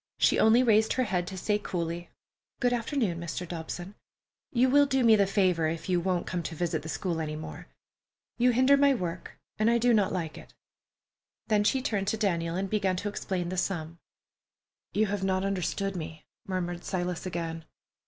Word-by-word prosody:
She - - +3
only 230 +3 +6
raised 220 -2 +4
her 255 - +1
head 180 -6 -1
to 190 - -6
say 210 +3 0
coldly, 170 -3 -4 0.5
"Good 245 -1 +2
afternoon, 230 - -1
Mr. 170 +1 -4
Dobson. 175 +3 -6 0.6
You 250 +1 +3
will 285 +2 +5
do 265 -2 +1
me 230 -1 +7
a 200 -2 +4
favor 185 -5 +2
if 165 0 -4
you 180 -1 +3
won't 180 0 -1
come 180 - -2
to 165 0 -5
visit 165 -1 -1
the 160 - -8
school 165 +3 -2
any 155 -1 -3
more. 155 - -8 0.7
You 250 +1 +5
hinder 260 +3 +5
my 280 -1 +4
work, 175 -5 -5 0.2
and 215 +1 +4
I 235 - +4
do 240 +1 +3
not 205 -4 +3
like 165 -4 -3
it." - - -16 0.9
Then 210 -1 +3
she 255 +5 +1
turned 205 -7 -1
to 220 - 0
Daniel 170 -6 0
and 195 +2 -1
began 195 -2 0
to 200 +3 -3
explain 185 -3 -3
the 185 - -4
sum. 165 -3 -2 0.9
"You 215 - +2
have 200 -1 -2
not 190 0 +1
understood 195 +1 -1
me," 160 -2 -7 0.2
murmured 175 -2 -3
Silas 180 -1 -3
again. 165 -2 -4
190 Hz, 190 wpm, -28 LUFS, 170-215 Hz, 0.9 s, me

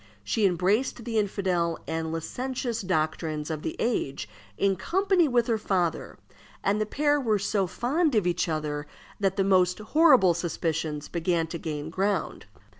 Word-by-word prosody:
She 200 - +2
embraced 205 +7 0
the 225 -2 0
infidel 185 -5 0
and 160 0 -2
licentious 245 +7 -3
doctrines 155 -3 -1
of 155 -1 -3
the - - -4
age 140 - -1 0.3
in 195 -1 +2
company 370 - +2
with 245 -3 +2
her 230 -2 0
father, 180 -5 -1 0.5
and 205 +2 +1
the 215 - 0
pair 290 +4 +1
were 220 -5 +2
so 200 -1 0
fond 285 - 0
of 210 -4 +2
each 175 0 0
other 150 -2 -3 0.3
that 195 -2 +1
the 195 - +2
most 185 -2 +3
horrible 250 - +5
suspicions 160 -3 -2
began 170 -1 0
to 165 +1 -6
gain 155 -1 -5
ground. 195 +3 -1
190 Hz, 155 wpm, -27 LUFS, 165-230 Hz, 0.5 s, horrible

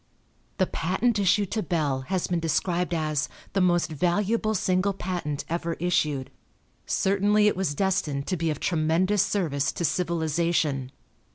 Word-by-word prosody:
The 185 - +3
patent 205 +7 0
issued 200 0 +2
to 220 - 0
Bell 150 -8 -1
has 185 -2 0
been 175 -1 -1
described 170 +3 0
as 155 -3 -1 0.2
"the 195 - +2
most 175 -3 +2
valuable 205 +7 +1
single 185 +1 +1
patent 175 -6 -4
ever 170 0 -2
issued." 150 -6 0 0.6
Certainly 205 +2 +2
it - - +2
was 180 -6 -1
destined 150 -7 0
to 185 - -1
be 165 -1 -1
of 150 -2 -2
tremendous 175 +4 +2
service 155 -9 0
to 170 - -2
civilization. 160 -5 0
175 Hz, 145 wpm, -26 LUFS, 155-190 Hz, 0.6 s, The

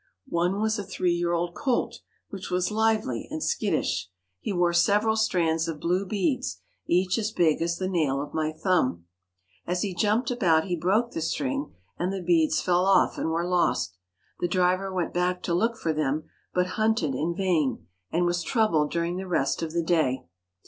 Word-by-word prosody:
One 175 +4 0
was 220 0 0
a - - -3
three 180 -2 0
year 175 0 0
old 170 0 -1
colt, 240 -2 -1 0.3
which 195 -2 -6
was 180 +2 0
lively 215 - 0
and - - -4
skittish. - - 0 0.3
He - - -4
wore 175 -2 +2
several 210 +5 +3
strands 170 -7 +1
of 160 -2 -4
blue 180 +4 0
beads, 175 - -1 0.3
each 185 +4 +2
as 215 -1 -1
big 165 -7 +2
as 170 0 0
the 185 - -2
nail 155 -7 +1
of 145 +1 -6
my 155 -1 0
thumb. 155 - 0 0.6
As 180 +1 0
he 200 -3 -2
jumped 215 +7 +1
about 175 -10 +3
he 180 -2 -1
broke 205 +8 +1
the 165 - -4
string 275 - -2 0.2
and 180 +2 0
the 195 - -3
beads 165 -2 +3
fell 180 0 +2
off 195 - +3
and - - -1
were 165 +1 0
lost. 170 - 0 0.4
The 175 - 0
driver 185 +2 +1
went 180 -2 -2
back 180 +1 0
to 170 - -1
look 225 +6 +1
for 160 -5 -1
them, 155 0 -1 0.3
but 180 0 +1 0.2
hunted 220 -10 +2
in 160 +6 -1
vain, 160 - 0 0.2
and 175 +2 +1
was 175 0 0
troubled 165 -6 +2
during 170 +1 -1
the 190 0 -5
rest 150 -6 0
of 165 -1 -3
the 170 +1 0
day. 155 -6 +1
175 Hz, 190 wpm, -26 LUFS, 165-195 Hz, 0.6 s, several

